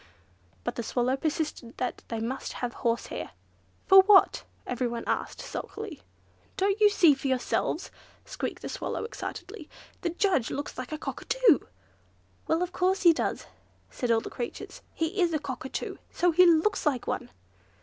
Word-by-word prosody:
But -, -, -3 dB
the -, -, -1 dB
Swallow 245 Hz, +3 st, 0 dB
persisted 300 Hz, -4 st, -3 dB
that 250 Hz, -, -3 dB
they 230 Hz, -, -3 dB
must 240 Hz, +4 st, -4 dB
have 245 Hz, -1 st, -4 dB
horsehair. 230 Hz, -, -2 dB, 0.5 s
"What 385 Hz, 0 st, +9 dB
for?" 415 Hz, -, +9 dB
asked -, -, -10 dB, 0.2 s
everyone, 240 Hz, -2 st, -2 dB, 0.3 s
sulkily. 425 Hz, -9 st, -6 dB, 0.6 s
"Don't 395 Hz, +2 st, +1 dB
you 420 Hz, -, +8 dB
see 345 Hz, -7 st, +6 dB
for 275 Hz, 0 st, -4 dB
yourselves," 260 Hz, -2 st, -1 dB, 0.3 s
squeaked -, -, -5 dB
the -, -, -4 dB
Swallow, -, -, -3 dB
excitedly; 445 Hz, -5 st, -7 dB, 0.3 s
"the 345 Hz, -, 0 dB
judge 345 Hz, -, +1 dB
looks 285 Hz, +1 st, -4 dB
like 255 Hz, +2 st, -6 dB
a 310 Hz, -, -2 dB
Cockatoo." -, -, +2 dB, 0.9 s
"Well, 325 Hz, +2 st, +2 dB
of 360 Hz, -, -4 dB
course 375 Hz, +1 st, +1 dB
he 340 Hz, -2 st, +8 dB
does," -, -, -2 dB, 0.5 s
said 245 Hz, -, -3 dB
all 225 Hz, -1 st, +4 dB
the -, -, -8 dB
creatures. 240 Hz, -, -6 dB
"He 335 Hz, +5 st, -1 dB
is 345 Hz, -2 st, +2 dB
a -, -, +1 dB
Cockatoo, 265 Hz, -2 st, -5 dB
so 355 Hz, 0 st, +2 dB
he 360 Hz, +2 st, +6 dB
looks 340 Hz, +5 st, +3 dB
like 260 Hz, -5 st, 0 dB
one!" -, -, -3 dB
310 Hz, 160 wpm, -28 LUFS, 250-370 Hz, 0.9 s, What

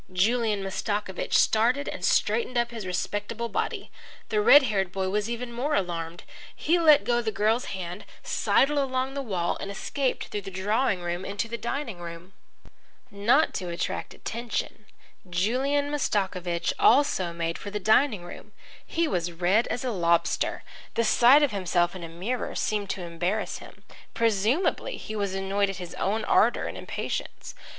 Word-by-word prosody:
Julian 210 Hz, +2 st, +1 dB
Mastakovich 195 Hz, 0 st, -3 dB
started 245 Hz, +6 st, +3 dB
and -, -, -5 dB
straightened 255 Hz, -, +1 dB
up 240 Hz, 0 st, +1 dB
his 220 Hz, -5 st, -6 dB
respectable 205 Hz, +5 st, -3 dB
body. -, -, -3 dB, 0.4 s
The 425 Hz, -, +2 dB
red 295 Hz, -10 st, +8 dB
haired 195 Hz, -6 st, 0 dB
boy 190 Hz, -1 st, -2 dB
was 210 Hz, +3 st, -1 dB
even 235 Hz, 0 st, -4 dB
more 280 Hz, +6 st, -1 dB
alarmed. 170 Hz, -, -3 dB, 0.3 s
He 345 Hz, +3 st, +2 dB
let 305 Hz, -3 st, +6 dB
go 240 Hz, 0 st, +1 dB
the 225 Hz, -2 st, -2 dB
girl's 220 Hz, +4 st, +1 dB
hand, 185 Hz, 0 st, -6 dB, 0.2 s
sidled 290 Hz, +2 st, +2 dB
along 260 Hz, -1 st, -1 dB
the 280 Hz, -, -3 dB
wall, 185 Hz, -9 st, -1 dB
and 195 Hz, -, -5 dB
escaped 260 Hz, +6 st, -2 dB
through 205 Hz, -, -3 dB
the 195 Hz, -, -7 dB
drawing 200 Hz, +2 st, 0 dB
room 175 Hz, +1 st, -3 dB
into 200 Hz, +3 st, -3 dB
the 235 Hz, -, -4 dB
dining 235 Hz, -3 st, -4 dB
room. 170 Hz, +2 st, -9 dB, 0.8 s
Not 235 Hz, +10 st, +3 dB
to 180 Hz, -2 st, -4 dB
attract 170 Hz, -, -4 dB
attention, 225 Hz, -2 st, -4 dB, 0.4 s
Julian 265 Hz, +11 st, +1 dB
Mastakovich 185 Hz, -10 st, -1 dB
also 230 Hz, -9 st, +4 dB
made 170 Hz, 0 st, -3 dB
for 205 Hz, -, -6 dB
the 210 Hz, +1 st, -3 dB
dining 220 Hz, 0 st, +3 dB
room. 175 Hz, -, -11 dB, 0.3 s
He 335 Hz, 0 st, 0 dB
was 175 Hz, -, -1 dB
red 180 Hz, +7 st, +2 dB
as 245 Hz, -, -3 dB
a 250 Hz, -, 0 dB
lobster. 170 Hz, -4 st, +1 dB, 0.3 s
The 230 Hz, -, +2 dB
sight 245 Hz, +6 st, +6 dB
of 290 Hz, -, +2 dB
himself 180 Hz, -3 st, 0 dB
in 180 Hz, -, -7 dB
a 165 Hz, -, -6 dB
mirror 195 Hz, +10 st, -3 dB
seemed 205 Hz, -2 st, -1 dB
to 185 Hz, -, -3 dB
embarrass 175 Hz, +5 st, -2 dB
him. -, -, -14 dB, 0.3 s
Presumably 230 Hz, -, +1 dB
he 215 Hz, -, -7 dB
was 200 Hz, -2 st, -2 dB
annoyed 195 Hz, +1 st, 0 dB
at 195 Hz, -, -4 dB
his 180 Hz, -2 st, -7 dB
own 215 Hz, +3 st, -1 dB
ardour 235 Hz, +3 st, +3 dB
and -, -, -5 dB
impatience. -, -, -5 dB
210 Hz, 165 wpm, -26 LUFS, 185-245 Hz, 0.8 s, red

